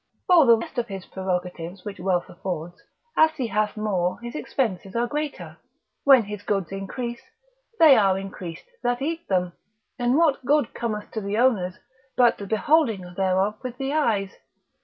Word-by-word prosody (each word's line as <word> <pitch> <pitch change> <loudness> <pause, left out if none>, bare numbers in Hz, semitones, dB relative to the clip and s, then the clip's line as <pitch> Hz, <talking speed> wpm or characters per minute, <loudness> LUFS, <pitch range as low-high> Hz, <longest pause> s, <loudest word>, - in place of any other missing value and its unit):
For 340 -7 +6
the 230 -1 +7
rest 225 - -5
of 235 - -2
his 195 -3 -7
prerogatives 180 -1 -4
which 205 -1 -6
wealth 180 -1 0
affords, 175 -1 -6 0.3
as 315 0 +4
he 260 - -2
hath 215 0 -1
more 185 -4 -1
his 240 0 -7
expenses 205 -10 -2
are 235 - +2
the - - -8
greater. 295 +1 -4 0.5
When 260 -6 +6
goods 195 -3 -2
increase, 235 +5 -5 0.6
they 315 -5 +8
are 195 -3 +3
increased 185 -3 -7 0.2
that 245 +2 0
eat 330 +3 -3
them; 180 -2 0 0.5
and 245 +3 +2
what 315 -5 +3
good 290 -1 +2
cometh 215 -3 -4
to 220 - -3
the 200 +1 -2
owners, 210 -8 +2 0.4
but 245 -2 +4
the 200 - -6
beholding 220 - +1
thereof 195 +2 +1
with 250 -1 -6
the 270 +1 -2
eyes? 210 -11 +1
215 Hz, 165 wpm, -24 LUFS, 190-255 Hz, 0.6 s, they